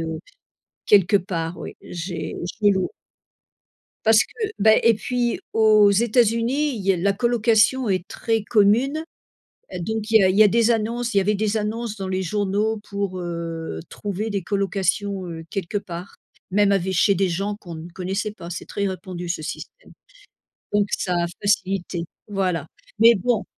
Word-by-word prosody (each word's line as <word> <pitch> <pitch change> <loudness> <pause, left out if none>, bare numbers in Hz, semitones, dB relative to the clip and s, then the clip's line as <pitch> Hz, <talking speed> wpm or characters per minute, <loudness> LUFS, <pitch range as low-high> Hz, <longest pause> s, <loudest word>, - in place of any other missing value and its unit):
heu. 160 -1 -4 0.7
Quelque 205 0 +5
part 175 -3 -4
oui, - - -8
j'ai 175 0 -5 0.3
j'ai 205 - +5
lou 190 -1 0 1.2
Parce 220 0 +6
que, 435 -2 -4
beh 220 +1 +5
et 230 -1 +5
puis 245 +1 -1
aux 215 -2 +5
États-Unis, 235 +6 +2
il 205 - -5
y 195 0 +3
a - - -1
la 200 +3 +1
colocation 235 +2 +2
est 185 -1 0
très 225 -2 -1
commune 240 +9 +2 0.7
et - - -5
donc 220 +4 -3
il 220 -1 +6
y - - +4
a - - +5
il 185 - +1
y 215 - +8
a 210 - +6
des 230 +2 +3
annonces 235 +1 -1
il 200 - +5
y - - +5
avait 210 +2 +1
des 215 +1 0
annonces 215 +1 -3
dans 195 -1 -5
les 190 0 -1
journaux 205 +3 0
pour, 200 -2 -3
heu, 165 - -5
trouver 205 +2 -4
des 200 -3 -2
colocations, 195 0 -1
heu, 165 -1 -7
quelque 195 +1 -2
part. 180 -1 -8 0.4
Même 200 0 +4
ave 190 -1 +1
chez 200 +2 +3
des 190 +1 +2
gens 195 +4 -2
qu'on 170 -3 -9
ne 160 +2 -8
connaissait 195 +4 -3
pas, 170 -4 -10
c'est - - -6
très 200 -1 -2
répandu 185 -2 -5
ce 170 -2 -3
système. 160 - -8 0.8
Donc 205 -1 +3
ça 180 - -2
a - - 0
facilité, 195 -4 0 0.2
voilà. 185 -6 -1 0.3
Mais 230 +1 +7
bon. 220 0 0
200 Hz, 175 wpm, -23 LUFS, 185-220 Hz, 1.2 s, y